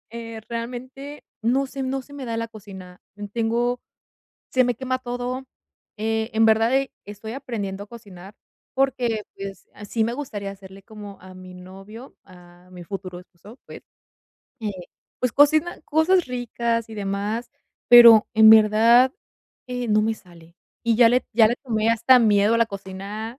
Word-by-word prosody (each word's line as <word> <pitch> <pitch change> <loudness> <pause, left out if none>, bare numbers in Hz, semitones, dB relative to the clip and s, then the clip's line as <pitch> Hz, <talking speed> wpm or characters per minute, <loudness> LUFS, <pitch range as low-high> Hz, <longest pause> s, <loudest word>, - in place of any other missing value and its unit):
Eh, 230 -1 -8
realmente 255 +5 -7 0.2
no 255 +5 +1
sé, 270 0 -7
no 265 +1 -3
se 285 - -16
me 275 -2 -7
da 230 -1 -4
la 230 0 -3
cocina. 190 -4 -13 0.3
Tengo, 240 +2 -1 0.7
se 255 -1 +3
me 245 -1 0
quema 255 +2 -3
todo. 250 +1 -5 0.5
Eh, 220 +1 -2
en 225 - +3
verdad, 225 +3 +3
e 270 0 0
estoy 205 +2 -9
aprendiendo 205 -7 -5
a - - -21
cocinar 200 -3 -13 0.4
porque, 250 -5 0
pues, 195 0 -9 0.2
sí 225 - -1
me 235 +2 -1
gustaría 215 -8 -6
hacerle, 195 0 -13
como 205 -1 -12
a 185 0 -14
mi 185 0 -12
novio, 195 +7 -13
a 180 -1 -18
mi 180 -1 -10
futuro 185 -1 -7
esposo, 195 +7 -17
pues, - - -11 0.8
eh, 215 - -3 0.5
pues, 250 -2 0
cocina 310 +6 +2
cosas 320 +4 +2
ricas 235 -2 -3
y 220 - -9
demás, 205 +3 -4 0.4
pero 235 -3 +9
en 220 0 +8
verdad, 225 +4 +5 0.6
eh, 250 -1 -4
no 210 0 +3
me 220 +1 0
sale 170 -4 -19 0.3
y 230 -2 +1
ya 230 -1 +6
le 250 +1 +2
ya 220 -2 +6
le 240 - -1
tomé 225 -4 -1
hasta 230 +3 +5
miedo 210 -1 +3
a - - +2
la 230 - +3
cocina. 200 +3 -8
225 Hz, 160 wpm, -23 LUFS, 200-245 Hz, 0.8 s, pero